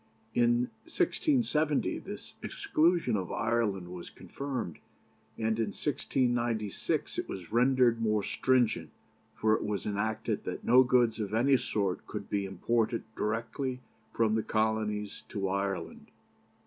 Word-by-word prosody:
In 120 +1 +3
1670 245 - +1
this - - -8
exclusion 165 -7 +2
of 95 -4 -2
Ireland 100 -6 0
was 90 -1 -7
confirmed, 135 - -5 0.6
and 110 0 0
in 115 - +1
1696 120 -7 -1
it - - -4
was 90 -3 -7
rendered 120 -1 +4
more 105 -2 +2
stringent, 125 +2 +1 0.5
for 110 0 +2
it - - +1
was 105 -2 -2
enacted 105 +1 -1
that - - -5
no 125 +1 +7
goods 125 -3 +3
of 105 0 -2
any 135 +4 +4
sort 100 -7 -1
could - - -6
be 100 -1 0
imported 115 +4 0
directly 125 +4 -2 0.3
from 110 -1 +2
the 110 - +2
Colonies 110 -2 -1
to 100 -2 -2
Ireland. 100 0 -3
115 Hz, 125 wpm, -30 LUFS, 105-125 Hz, 0.6 s, no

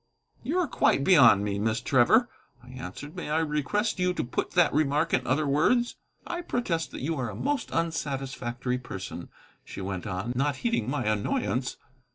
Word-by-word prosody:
"You 320 +6 -2
are 360 -3 +2
quite 140 - +2
beyond 135 - +6
me, 100 -1 -2
Miss 110 +2 0
Trevor," 140 - +4 0.4
I 125 - -15
answered; 130 - -8
"may - - -5
I 155 - +1
request 160 +8 0
you 180 0 +1
to - - -1
put 120 - -3
that 175 -3 +4
remark 150 +2 +1
in 125 - +1
other 145 +5 +2
words?" 155 - +2 0.3
"I 345 0 -4
protest 190 - -2
that - - -8
you 160 +4 -1
are 125 -3 -2
a 105 - -7
most 290 - -1
unsatisfactory 135 -6 -2
person," 95 -6 -7 0.3
she - - -9
went 95 0 -4
on, 95 +5 -3
not 140 +3 +1
heeding 230 - +1
my 145 -3 -1
annoyance. 110 +3 -1
140 Hz, 180 wpm, -27 LUFS, 120-165 Hz, 0.4 s, beyond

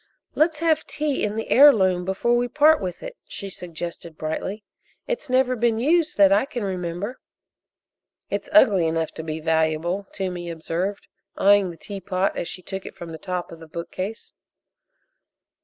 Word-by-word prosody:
"Let's 310 0 +2
have 320 -2 +2
tea 295 -2 -2
in 210 0 -1
the 225 - -4
heirloom 190 -11 +6
before 195 +6 +1
we 245 0 +1
part 300 +4 +4
with 180 -2 -5
it," - - -7
she 200 -1 -6
suggested 170 -2 -7
brightly. 190 +7 -4 0.4
"It's 480 - -4
never 255 0 +3
been 230 -1 +1
used 315 +7 +2
that 200 -1 +6
I 205 +6 +4
can 275 -6 -5
remember." 185 +4 -4 1.1
"It's - - -4
ugly 195 - +5
enough 160 0 -1
to 160 - -7
be 155 0 -4
valuable," 160 +4 0
Toomey 180 -3 -4
observed, 170 +4 -3 0.3
eyeing 200 -1 +5
the 170 - -9
teapot 195 -1 -2
as - - -3
she 185 - -8
took 190 +1 -5
it - - -10
from 170 -1 -8
the 160 - -8
top 180 -1 -4
of 165 - -10
the 160 - -12
bookcase. 185 +6 -6
195 Hz, 165 wpm, -24 LUFS, 170-240 Hz, 1.1 s, heirloom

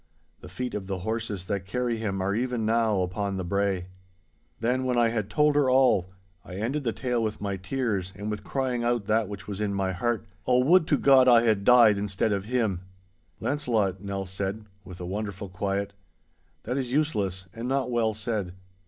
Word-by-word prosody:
The 90 - -11
feet 125 +7 -4
of 100 -2 -4
the 95 -1 -2
horses 110 -2 -3
that 95 -1 -3
carry 125 0 -1
him 100 -4 -2
are 100 +1 0
even 120 0 -1
now 110 -3 +2
upon 95 +2 -2
the 95 - -2
brae.' 95 0 0 0.7
Then, 125 +3 0
when 125 -1 0
I 120 -1 +4
had 110 -3 -2
told 150 +4 +3
her 145 -3 +3
all, 130 -8 +4 0.3
I 90 - -9
ended 125 +9 -2
the 115 - 0
tale 125 -1 -1
with 110 -1 -2
my 100 -1 -2
tears 95 -1 -2
and 105 +3 -4
with 105 -1 -5
crying 130 -2 -1
out 120 -3 0
that 110 0 +1
which 100 0 -8
was 100 0 -5
in 100 -1 -1
my 95 -1 0
heart, 115 +4 -1 0.2
'Oh, 125 0 +4
would 170 +1 +5
to 145 - +3
God 135 -2 +6
I 120 -2 +7
had 110 -4 +2
died 115 -3 +6
instead 100 +2 0
of 100 -1 -2
him!' 110 -6 0 0.6
'Launcelot,' 110 -10 0
Nell 100 -1 -4
said, 95 +3 -4 0.2
with 90 -3 -11
a 90 - -5
wonderful 100 +1 -4
quiet, 100 +1 -2 0.7
'that 130 +2 -2
is 125 -2 -3
useless, 105 - 0
and 115 +2 -5
not 135 -1 0
well 115 -2 +1
said. 105 -4 -3
110 Hz, 195 wpm, -27 LUFS, 100-125 Hz, 0.7 s, I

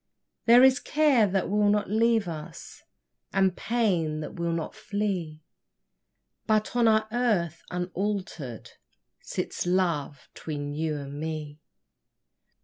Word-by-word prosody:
There 240 +2 +8
is 265 +1 +6
care 290 -8 +3
that 195 -1 0
will 205 +1 +2
not 205 0 +1
leave 220 0 +2
us, 160 0 -8 0.5
And 190 -1 +2
pain 180 -10 0
that - - -6
will 170 -1 -2
not 165 -1 -3
flee; 195 -8 -3 1.0
But 215 +1 +1
on 240 -1 +4
our 220 0 +4
hearth 210 -9 0
unalter'd 180 - -4 0.5
Sits - - -4
Love 170 -7 0
'tween 145 -2 -5
you 155 0 -2
and 140 0 -7
me. 155 -1 -5
185 Hz, 120 wpm, -27 LUFS, 155-215 Hz, 1.0 s, There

